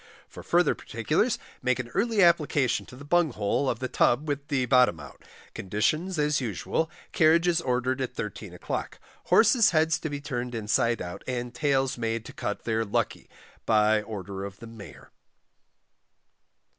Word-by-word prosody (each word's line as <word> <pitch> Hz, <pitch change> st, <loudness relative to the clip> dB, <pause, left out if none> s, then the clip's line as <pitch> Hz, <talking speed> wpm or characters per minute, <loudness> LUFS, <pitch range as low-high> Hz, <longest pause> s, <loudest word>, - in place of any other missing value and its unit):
_ -, -, -24 dB, 0.2 s
For -, -, -11 dB
further -, -, +2 dB
particulars -, -, -1 dB, 0.2 s
make 125 Hz, -1 st, +1 dB
an 125 Hz, -2 st, -5 dB
early 215 Hz, -, +2 dB
application 150 Hz, -6 st, +2 dB
to -, -, -12 dB
the 140 Hz, +3 st, -11 dB
Bung 170 Hz, -2 st, +2 dB
hole 110 Hz, +6 st, 0 dB
of 115 Hz, -, -1 dB
the 130 Hz, -, -3 dB
Tub 130 Hz, +4 st, +2 dB
with 145 Hz, -1 st, -3 dB
the 135 Hz, -3 st, 0 dB
bottom 125 Hz, -9 st, +4 dB
out. -, -, -12 dB, 0.3 s
Conditions 155 Hz, -, -1 dB
as 150 Hz, -1 st, +1 dB
usual. 115 Hz, -, -2 dB, 0.2 s
Carriages 170 Hz, +2 st, +3 dB
ordered 130 Hz, -1 st, -1 dB
at 130 Hz, -, -4 dB
13 105 Hz, -3 st, -6 dB
o'clock. -, -, -5 dB, 0.3 s
Horses 225 Hz, 0 st, +5 dB
heads 160 Hz, -1 st, +2 dB
to 155 Hz, -, -4 dB
be 145 Hz, -1 st, -4 dB
turned 125 Hz, -4 st, -4 dB
inside 115 Hz, +1 st, 0 dB
out, 90 Hz, 0 st, -8 dB
and 125 Hz, -1 st, -3 dB
Tails 135 Hz, -1 st, 0 dB
made 115 Hz, 0 st, -2 dB
to -, -, -10 dB
cut 105 Hz, -, -4 dB
their 115 Hz, -1 st, 0 dB
Lucky 100 Hz, -, -2 dB, 0.4 s
by 110 Hz, -1 st, +4 dB
order 100 Hz, -3 st, -6 dB
of 100 Hz, 0 st, -7 dB
the -, -, -11 dB
MAYOR. 115 Hz, -3 st, -12 dB
125 Hz, 165 wpm, -27 LUFS, 115-150 Hz, 0.4 s, Horses